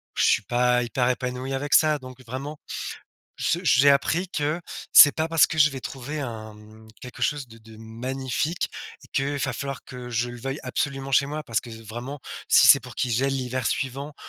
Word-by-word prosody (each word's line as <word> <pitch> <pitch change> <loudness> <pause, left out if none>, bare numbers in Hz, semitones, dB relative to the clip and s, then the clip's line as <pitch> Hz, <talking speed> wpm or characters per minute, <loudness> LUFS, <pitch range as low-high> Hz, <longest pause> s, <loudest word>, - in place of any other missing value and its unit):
je - - +1
suis - - +3
pas 125 0 +2
hyper 125 +1 0
épanoui 125 +1 -3
avec 145 +2 -2
ça. 155 -2 +4
Donc 130 0 -12
vraiment, 140 +5 -6 0.8
je 170 - 0
j'ai 140 -4 +5
appris 160 +6 +2
que, 150 +1 -2 0.3
c'est 145 - +10
pas 160 +1 -2
parce 165 -2 +5
que 160 - -5
je 150 -1 +7
vais 135 -1 -7
trouver 140 +3 -6
un, 110 -5 -6
mmh, 110 +1 -16
quelque 125 - -10
chose 145 -3 0
de 115 - -14
de 110 0 -15
magnifique, 130 +8 -3 0.4
que 140 +1 0
va - - -2
falloir 140 -1 -5
que 125 -1 -9
je 120 0 -1
le 120 - -9
veuille 135 +4 -4
absolument 135 -1 -3
chez 140 +2 +4
moi 150 +2 -4
parce 115 -4 -1
que 120 - -12 0.2
vraiment, 120 +6 -7 0.3
si - - +6
c'est - - +8
pour - - -11
qu'il 125 - -1
gèle 135 +4 +1
l'hiver 130 -1 -2
suivant 140 +2 -3
130 Hz, 195 wpm, -25 LUFS, 120-145 Hz, 0.8 s, c'est